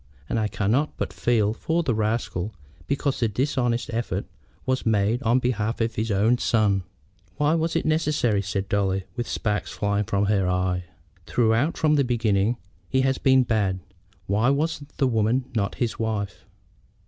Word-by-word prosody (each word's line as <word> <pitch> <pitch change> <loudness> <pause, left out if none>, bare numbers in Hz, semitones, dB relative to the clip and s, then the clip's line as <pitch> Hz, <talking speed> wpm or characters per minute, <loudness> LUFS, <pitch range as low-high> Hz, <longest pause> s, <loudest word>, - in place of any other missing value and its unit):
And 115 - 0
I 110 - +1
cannot 110 +9 0
but - - -3
feel 110 -3 +2
for 165 +8 -1
the 130 - +1
rascal 110 -3 -1 0.3
because 140 0 0
the 120 - +2
dishonest 120 +1 0
effort 115 +1 -2 0.4
was 130 0 0
made 110 +2 +2
on 120 -1 +3
behalf 115 -3 -1
of 115 0 0
his 110 +1 -2
own 110 +5 +3
son." 105 -4 +2 0.6
"Why 150 +1 +3
was 165 0 0
it 165 - 0
necessary?" 150 -9 +1
said 95 0 -3
Dolly, 95 -2 0
with 120 -1 -3
sparks 105 -2 -1
flying 100 0 0
from 100 +1 +1
her 100 -3 +2
eye. 90 0 0 0.4
"Throughout 120 +6 +2
from 155 -1 +3
the 140 - +4
beginning 115 -2 +1 0.3
he 130 - +2
has 135 0 +1
been 130 -1 +5
bad. 100 -5 0 0.5
Why 110 +6 +2
was 150 +4 +1 0.2
the 135 - +2
woman 120 +1 +1
not 100 -4 -1
his 120 -3 -2
wife?" 105 -4 -3
115 Hz, 165 wpm, -25 LUFS, 100-130 Hz, 0.6 s, been